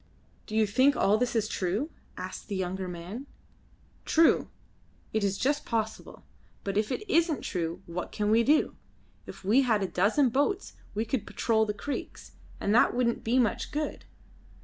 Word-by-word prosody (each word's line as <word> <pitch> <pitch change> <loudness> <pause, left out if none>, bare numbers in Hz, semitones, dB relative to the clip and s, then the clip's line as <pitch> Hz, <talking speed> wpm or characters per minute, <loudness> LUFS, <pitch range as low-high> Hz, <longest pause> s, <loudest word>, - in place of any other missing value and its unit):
"Do 215 - -5
you 220 0 +4
think 260 +7 +4
all 210 +2 +3
this 250 0 0
is 215 -2 +2
true?" 205 - -1 0.3
asked - - -6
the 205 - -3
younger 190 0 -2
man. 180 +10 -7 0.8
"True! 325 0 +4 0.7
It 220 -1 +1
is 200 -1 +1
just 285 +5 +1
possible. 220 -2 -3 0.4
But 195 -1 -3
if 210 +1 +1
it 425 - -3
isn't 330 -4 +2
true 170 -2 -3
what 170 +1 -5
can 210 0 0
we 225 +1 +5
do? 295 +6 +3 0.5
If - - -10
we 225 +8 +5
had 220 -6 +2
a - - 0
dozen 220 +10 +3
boats 290 - 0 0.2
we 220 +2 0
could 235 -1 -2
patrol 220 -1 +1
the 210 - -2
creeks; 285 +7 -6 0.3
and 200 - +1
that 240 - +5
wouldn't 240 -1 +1
be 235 +3 +2
much 240 -4 +1
good. 300 +1 -3
220 Hz, 170 wpm, -29 LUFS, 200-265 Hz, 0.8 s, we